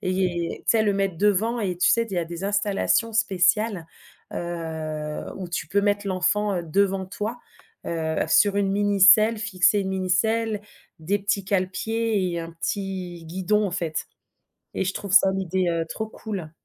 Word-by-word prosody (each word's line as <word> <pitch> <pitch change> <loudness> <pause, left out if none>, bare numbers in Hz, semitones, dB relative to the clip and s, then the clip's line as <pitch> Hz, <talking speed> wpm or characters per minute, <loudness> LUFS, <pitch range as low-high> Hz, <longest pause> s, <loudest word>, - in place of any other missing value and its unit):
et 180 -2 -1
tu - - +4
sais - - +4
le 205 -2 +1
mettre 195 -4 -1
devant 210 +4 +2
et 185 -4 -2
tu 175 - +3
sais 230 0 +2
d 200 - -11
il - - -1
y 175 - 0
a 170 - -1
des 170 +2 -8
installations 205 +2 +1
spéciales, 195 -2 +1 0.5
heu, 160 -3 -4
où 185 -2 -6
tu 170 - -3
peux 200 0 +1
mettre 205 0 0
l'enfant, 195 +2 +1
heu, 175 - -2
devant 190 +3 0
toi, 210 +5 -5 0.5
heu, 160 -1 -2
sur 200 -1 +4
une 195 -1 +1
mini 205 0 +1
selle, 215 +4 +7
fixer 200 -1 +2
une 190 - -3
mini 190 -1 -2
selle, 220 +3 +1 0.4
des 195 +6 0
petits 200 0 -1
cale-pieds 200 +1 -1
et 170 - -2
un 165 0 -7
petit 180 0 -4
guidon 190 +5 0
en - - -3
fait 170 -3 -3 0.7
et - - 0
je 190 0 -2
trouve 200 -3 -5
ça, 195 -1 +6
l'idée, 190 -1 -1
heu, 165 -1 0
trop 220 - -4
cool. 200 -7 -7
190 Hz, 185 wpm, -24 LUFS, 175-205 Hz, 0.7 s, selle